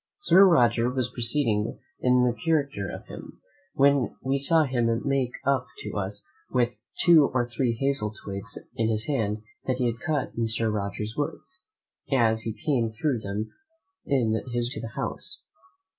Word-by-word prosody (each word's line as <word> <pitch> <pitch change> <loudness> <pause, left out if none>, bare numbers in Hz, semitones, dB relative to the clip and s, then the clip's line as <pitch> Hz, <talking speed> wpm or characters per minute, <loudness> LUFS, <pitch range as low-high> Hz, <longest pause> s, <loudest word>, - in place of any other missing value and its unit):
Sir 195 - +6
Roger 120 - +4
was 130 -1 -1
proceeding 115 -3 0 0.2
in 125 0 +3
the 125 -1 +2
character 140 -8 -1
of - - -8
him, - - -11 0.4
when 140 -2 +3
we 135 +1 0
saw 160 +3 +5
him 125 -4 0 0.2
make 135 -3 0
up 140 -1 +1
to 425 - -5
us - - -4 0.2
with 120 -1 0 0.2
two 165 -5 +6
or 125 -2 +1
three 120 0 -1
hazel 135 -3 0
twigs 100 +1 -4 0.2
in 115 -1 0
his 110 0 +1
hand 110 -6 -1 0.2
that 130 -1 +1
he 125 - 0
had 115 -1 -1
cut 145 -2 -1
in 115 -1 0
Sir 110 0 +1
Roger's 105 +1 -3
woods, 155 +2 -5 0.5
as 115 -4 +3
he 110 -1 -6
came 125 -7 +2
through 120 +3 -1
them, 105 +1 -4 0.5
in 125 -6 +1 0.2
his 120 0 0
way - - -4
to - - -6
the 115 -2 -7
house. - - 0
120 Hz, 170 wpm, -26 LUFS, 110-140 Hz, 0.5 s, Sir